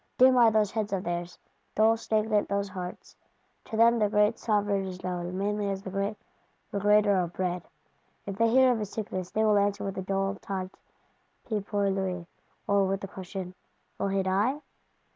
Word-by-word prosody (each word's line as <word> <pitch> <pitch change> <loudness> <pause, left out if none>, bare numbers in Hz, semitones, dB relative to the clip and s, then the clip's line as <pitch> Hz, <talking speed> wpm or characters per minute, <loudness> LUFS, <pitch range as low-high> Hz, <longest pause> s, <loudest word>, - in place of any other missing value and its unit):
Dim 255 0 +7
are 235 -2 +7
those 215 -2 +2
heads 215 -2 -2
of 190 -1 -1
theirs, 175 0 -4 0.4
dull 220 +1 +5
stagnant 215 -1 0
those 200 0 -1
hearts: 180 -1 -8 0.5
to 220 - -5
them 235 +1 +5
the 210 -1 +2
great 210 0 +2
Sovereign 205 -3 0
is 185 -1 -8
known 180 0 -3
mainly 205 +1 -1
as 195 0 -3
the 190 - -6
great 200 +2 -2 0.6
Regrater 205 0 +4
of 175 0 -6
Bread. 180 -1 -2 0.6
If 200 - -4
they 230 +3 +3
hear 260 +2 +5
of 235 - 0
his 210 -2 -4
sickness, 185 -5 -4
they 220 - 0
will 210 -1 +4
answer 200 0 0
with 195 -1 -4
a - - -2
dull 195 +1 -1
Tant 190 -1 -5 0.7
pis 215 -4 -2
pour 200 -1 +1
lui; 185 -2 -2 0.4
or 200 -1 +3
with 195 +1 -1
the 195 - -5
question, 190 -1 -7 0.5
Will 200 - 0
he 195 0 0
die? 205 +10 +1
200 Hz, 185 wpm, -28 LUFS, 190-215 Hz, 0.7 s, Dim